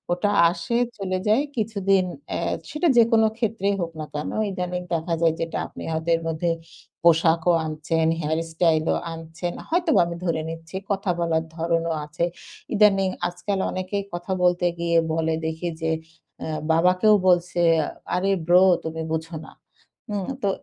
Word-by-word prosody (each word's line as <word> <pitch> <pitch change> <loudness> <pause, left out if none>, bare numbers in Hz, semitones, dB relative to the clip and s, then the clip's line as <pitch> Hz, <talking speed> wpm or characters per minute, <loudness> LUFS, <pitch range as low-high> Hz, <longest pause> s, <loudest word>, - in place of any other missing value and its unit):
ওটা 205 +3 0 0.2
আসে, 235 +5 -2 0.2
চলে 185 -2 -2
যায় 225 +7 +4
কিছুদিন 195 -3 +1 0.2
অ্যা - - -2 0.3
সেটা 320 +3 0
যেকোনো 225 -1 +5
ক্ষেত্রেই 205 -3 0
হোক 165 -1 -3
না 155 - -3
কেন। 150 0 -3 0.2
ইদানিং 180 -1 -3
দেখা 165 +1 -1
যায় 165 -1 +4
যেটা 165 - -2
আপনি - - -10
হয়তো 160 +1 -2
এর 165 - -3
মধ্যে 165 +2 -1 0.5
পোশাকও 165 +1 +4
আনছেন, 160 +1 -1
হেয়ার 160 +1 0
স্টাইলও 160 -1 +2 0.2
আনছেন। 165 +2 -5 0.2
হয়তোবা 340 -1 +3
আমি 170 0 -5
ধরে 160 -2 0
নিচ্ছি। 165 +2 -9 0.2
কথা 195 -1 -1
বলার 165 -1 +1
ধরণও 165 0 0
আছে। 170 +3 -1 0.5
ইদানিং 195 -2 +4 0.2
আজকাল 190 +3 -3
অনেকেই 185 +2 -3
কথা 175 +2 -5
বলতে 180 0 +3
গিয়ে 170 0 +2 0.2
বলে 160 0 0
দেখি 160 +2 -3
যে 160 0 0 0.5
অ্যা 160 - -4 0.2
বাবাকেও 180 +6 +4
বলছে, 175 0 +2 0.5
"আরে 195 +2 +1 0.2
ব্রো, 180 +2 +6 0.2
তুমি 160 0 -4
বুঝো 160 +1 -3
না।" - - -13 0.6
হুম? 200 -3 -2 0.2
তো 200 - +2
175 Hz, 150 wpm, -24 LUFS, 165-195 Hz, 0.6 s, ব্রো